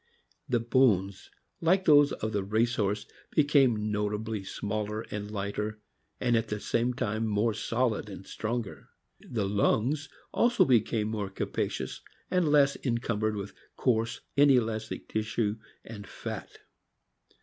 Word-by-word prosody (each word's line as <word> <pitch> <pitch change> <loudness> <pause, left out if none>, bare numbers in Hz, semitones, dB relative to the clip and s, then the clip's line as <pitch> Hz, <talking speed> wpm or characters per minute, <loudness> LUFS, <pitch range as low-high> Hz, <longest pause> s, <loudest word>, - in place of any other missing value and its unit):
The 120 -2 +2
bones, 110 -6 +2 0.3
like 185 +3 +3
those 145 -2 +6
of 110 - -3
the 100 -2 -1
race 110 +4 +1
horse, 105 +1 0 0.2
became 135 -8 +3
notably 105 0 -2
smaller 105 +2 -3
and 105 0 -4
lighter, 105 +1 -3 0.4
and 120 -1 +2
at 115 - +1
the 105 - -3
same 120 +3 0
time 110 -2 -1
more 105 +2 +1
solid 115 -1 -1
and 95 -1 -9
stronger. 115 -2 -4 0.3
The 110 -5 -3
lungs 120 +9 +1 0.2
also 240 +1 +4
became 110 -3 +2
more 105 -3 -3
capacious, 95 - -3 0.3
and 180 -4 +2
less 140 -2 +5
encumbered 115 -4 0
with 100 0 -5 0.2
coarse, 115 -3 0
inelastic 115 -6 +2
tissue 110 0 -1 0.3
and 105 -3 -9
fat. - - -6
110 Hz, 125 wpm, -29 LUFS, 105-125 Hz, 0.4 s, those